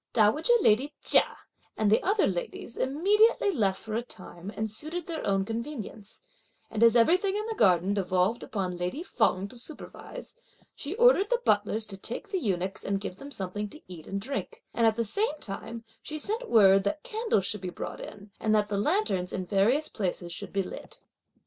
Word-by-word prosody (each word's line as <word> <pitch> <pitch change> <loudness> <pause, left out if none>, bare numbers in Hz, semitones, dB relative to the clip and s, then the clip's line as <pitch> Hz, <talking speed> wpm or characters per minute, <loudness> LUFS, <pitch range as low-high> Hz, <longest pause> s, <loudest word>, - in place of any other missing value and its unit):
Dowager 230 - +3
lady 265 - +3
Chia - - +5 0.4
and 210 -2 +2
the 220 - +4
other 400 +3 +2
ladies 190 +5 -4
immediately 405 - +3
left 200 - +1
for 220 - -7
a 230 - 0
time 185 -4 -10
and 220 - -1
suited 310 +11 -5
their 330 -2 -5
own 195 -1 +1
convenience, 225 -2 -6 0.5
and 215 - -3
as 230 0 +6
everything 365 - +4
in 425 +1 -2
the 450 - -3
garden 185 - +3
devolved 185 +2 +1
upon 185 -4 -3
lady 180 - -3
Feng 195 - +1
to 245 - -13
supervise, 320 - -9 0.4
she 295 +7 -5
ordered 470 -4 +5
the - - +2
butlers 210 +1 +2
to 200 -2 -7
take 245 - -5
the 380 - 0
eunuchs 190 - -2
and 200 0 -1
give 190 -2 -6
them 280 - -9
something 205 -3 -4
to 305 - -13
eat 175 -4 -10
and 195 - -3
drink; 280 - -5
and 230 -1 +3
at 220 - +3
the 230 0 -1
same 310 - 0
time, 230 +2 -5 0.2
she 310 - -5
sent 445 +10 -1
word 195 -3 +6
that 205 +10 -2
candles 440 - 0
should 210 -1 -2
be 185 - -4
brought - - -6
in 200 0 -10
and 215 -1 +2
that 210 -1 +2
the 200 -1 -1
lanterns 205 - 0
in 185 - -2
the 185 +2 -6
various 245 +11 +3
places 180 -4 -3
should - - -7
be 195 0 0
lit. - - -9
220 Hz, 195 wpm, -28 LUFS, 195-310 Hz, 0.5 s, as